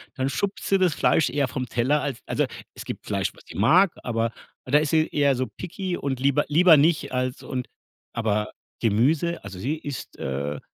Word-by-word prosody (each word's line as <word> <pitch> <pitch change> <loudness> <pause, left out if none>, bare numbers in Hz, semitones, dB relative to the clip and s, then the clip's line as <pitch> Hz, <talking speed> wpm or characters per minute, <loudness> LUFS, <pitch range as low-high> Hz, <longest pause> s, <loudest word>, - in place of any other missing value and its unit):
dann 130 0 -1
schubst 195 +10 -2
sie 195 - +4
das 180 -5 +2
Fleisch 160 - +3
eher 145 -2 0
vom 130 0 -3
Teller, 130 +6 +1
als 135 -6 -3
also, - - 0 0.3
es - - -8
gibt - - -7
Fleisch, - - -1
was - - -18
sie - - -11
mag, 170 - +5
aber 115 -1 -1 0.3
da 140 +3 +4
ist 150 -1 -1
sie 160 0 +3
eher 140 -2 +2
so 130 +1 -1
picky 180 0 -4
und 135 -2 -3
„lieber 140 +2 +2
lieber 165 +2 +7
nicht“ 150 -2 +2
als 125 0 -1
und 125 -1 -4 0.5
aber 105 -2 0 0.3
Gemüse 140 +10 +2
also, 100 -2 -8
sie 140 +11 -2
isst, 145 -3 -7
äh, 70 +2 -3
140 Hz, 195 wpm, -25 LUFS, 120-160 Hz, 0.5 s, lieber